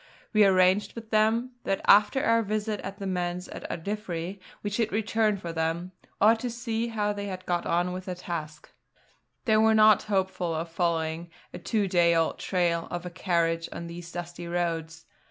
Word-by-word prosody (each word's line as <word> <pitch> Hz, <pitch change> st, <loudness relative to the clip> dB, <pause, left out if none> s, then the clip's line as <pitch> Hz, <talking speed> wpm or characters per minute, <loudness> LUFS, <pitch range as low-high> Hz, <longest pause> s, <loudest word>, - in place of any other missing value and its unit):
We 215 Hz, -1 st, +6 dB
arranged 185 Hz, +1 st, +3 dB
with 230 Hz, -1 st, -9 dB
them 225 Hz, +3 st, +2 dB
that 195 Hz, -, -1 dB
after 210 Hz, +7 st, +5 dB
our 230 Hz, 0 st, +4 dB
visit 215 Hz, 0 st, -2 dB
to 195 Hz, +1 st, -6 dB
the 200 Hz, -, -6 dB
Manse 180 Hz, -1 st, -2 dB
at -, -, -8 dB
Ardiffery 190 Hz, -1 st, -4 dB, 0.2 s
we 205 Hz, -, -2 dB
should 220 Hz, +1 st, 0 dB
return 215 Hz, 0 st, +1 dB
for 170 Hz, -3 st, -6 dB
them, 165 Hz, +2 st, -2 dB, 0.3 s
or 215 Hz, +2 st, +7 dB
to 245 Hz, +2 st, -3 dB
see 235 Hz, -1 st, -2 dB
how 210 Hz, -2 st, -1 dB
they 205 Hz, 0 st, -5 dB
had 185 Hz, -1 st, -6 dB
got 175 Hz, -1 st, -1 dB
on 175 Hz, +1 st, +1 dB
with 185 Hz, 0 st, -6 dB
their 185 Hz, -, -4 dB
task. 155 Hz, -4 st, -6 dB, 0.7 s
They 220 Hz, -3 st, +4 dB
were 220 Hz, 0 st, +5 dB
not 215 Hz, -1 st, +6 dB
hopeful 190 Hz, -4 st, 0 dB
of 165 Hz, +1 st, -4 dB
following 165 Hz, -1 st, -1 dB, 0.2 s
a -, -, -6 dB
two 210 Hz, -4 st, 0 dB
day 175 Hz, -2 st, +4 dB
old 165 Hz, -1 st, +1 dB
trail 170 Hz, -3 st, 0 dB
of 175 Hz, 0 st, -5 dB
a 180 Hz, -, -5 dB
carriage 170 Hz, -2 st, 0 dB
on 170 Hz, -, -6 dB
these 170 Hz, 0 st, -8 dB
dusty 175 Hz, 0 st, -6 dB
roads. 165 Hz, -2 st, -2 dB
185 Hz, 185 wpm, -27 LUFS, 170-215 Hz, 0.7 s, or